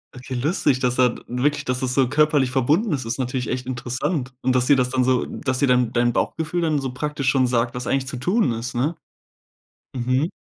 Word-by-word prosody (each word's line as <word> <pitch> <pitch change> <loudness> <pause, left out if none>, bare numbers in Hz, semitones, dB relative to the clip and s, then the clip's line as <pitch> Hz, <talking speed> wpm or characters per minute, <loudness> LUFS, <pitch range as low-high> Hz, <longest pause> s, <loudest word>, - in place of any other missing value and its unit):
Okay, 130 +1 -7
lustig, 135 0 +1
dass 125 -1 0
er 125 -2 +4
wirklich, 145 +4 0
dass 125 0 -1
das 130 -1 -2
so 135 -2 +3
körperlich 145 -1 +2
verbunden 150 - +2
ist, 130 -3 -2
ist 115 +1 -3
natürlich 125 -1 -2
echt 125 0 -3
interessant 130 +3 -3
und 130 0 +2
dass 125 0 +2
dir 145 - +6
das 125 -1 +1
dann 130 0 +2
so 130 -1 +2
dass 130 -3 -3
dir 140 - +2
dann 125 -2 +3
dein 120 0 +2
Bauchgefühl 160 +7 -1
dann 155 -3 +1
so 135 -2 -3
praktisch 145 0 -3
schon 130 -2 +3
sagt, 120 -1 0
was 125 0 -5
eigentlich 135 -1 0
zu 135 - -5
tun 180 - +1
ist, 115 +2 -4
ne? 145 +8 0 1.0
Mhm. 130 +5 0
130 Hz, 220 wpm, -22 LUFS, 125-145 Hz, 1.0 s, dir